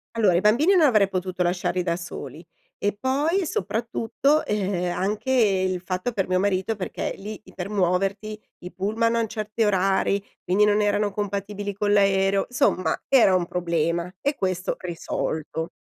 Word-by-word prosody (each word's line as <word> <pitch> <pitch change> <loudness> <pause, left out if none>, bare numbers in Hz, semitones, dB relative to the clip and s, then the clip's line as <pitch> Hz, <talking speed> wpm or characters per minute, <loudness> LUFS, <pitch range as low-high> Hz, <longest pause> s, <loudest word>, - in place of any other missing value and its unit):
Allora, 210 -5 +3
i 175 - +3
bambini 270 - +4
non 355 - +5
avrei 215 -5 +4
potuto 185 -1 -3
lasciarli 180 +1 0
da 170 -1 0
soli 170 0 -8 0.3
e 205 0 0
poi, 300 +8 +1
soprattutto, 235 - 0
e 210 - 0 0.3
ehm, 175 - -3
anche 210 +7 -1
il 190 -7 +2
fatto 185 +6 -3
per 195 -4 -1
mio 185 0 +1
marito 195 +2 0
perché 190 -3 -4
lì 210 +2 -8
i 185 - -16
per 185 +1 -5
muoverti, 195 +2 0 0.3
i 180 - -8
pullman 225 +4 0
hanno 230 -1 +1
certi 215 +1 -2
orari, 195 0 +2 0.2
quindi 200 +3 +3
non 210 0 +3
erano 205 0 +1
compatibili 205 0 -3
con 205 +1 0
l'aereo 195 -1 +3
insomma 215 -6 +1
era 230 -8 +5
un 175 - -2
problema! 170 0 -1
E 285 +6 -1
questo 185 -3 -2
risolto. 160 -2 -4
200 Hz, 165 wpm, -24 LUFS, 185-215 Hz, 0.3 s, non